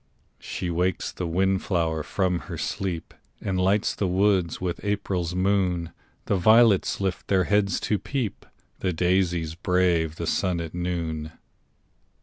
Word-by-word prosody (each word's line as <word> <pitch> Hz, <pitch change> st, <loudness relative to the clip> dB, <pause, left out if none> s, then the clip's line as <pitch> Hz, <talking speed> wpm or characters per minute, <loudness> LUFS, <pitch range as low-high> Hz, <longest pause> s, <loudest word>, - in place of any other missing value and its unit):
She 90 Hz, -, -4 dB
wakes 90 Hz, +1 st, 0 dB
the 90 Hz, -, -4 dB
wind 95 Hz, +3 st, +1 dB
flower 80 Hz, -4 st, 0 dB
from 90 Hz, +2 st, 0 dB
her -, -, -4 dB
sleep, 90 Hz, -4 st, -3 dB, 0.3 s
And 95 Hz, -2 st, -1 dB
lights 100 Hz, +3 st, +2 dB
the 100 Hz, -, -1 dB
woods 95 Hz, -2 st, +2 dB
with 90 Hz, -2 st, -3 dB
April's 95 Hz, -4 st, -1 dB
moon; 90 Hz, -3 st, +1 dB, 0.3 s
The 100 Hz, -, +1 dB
violets 110 Hz, +1 st, +5 dB
lift 95 Hz, -2 st, -2 dB
their 95 Hz, -2 st, +3 dB
heads 100 Hz, -1 st, +2 dB
to 105 Hz, -, 0 dB
peep, 130 Hz, -7 st, -4 dB, 0.3 s
The 90 Hz, -, -1 dB
daisies 90 Hz, -2 st, +1 dB
brave 85 Hz, -3 st, +1 dB
the 85 Hz, -, -4 dB
sun 90 Hz, +1 st, 0 dB
at 80 Hz, -1 st, -5 dB
noon. 85 Hz, -3 st, -3 dB
90 Hz, 140 wpm, -25 LUFS, 85-95 Hz, 0.3 s, violets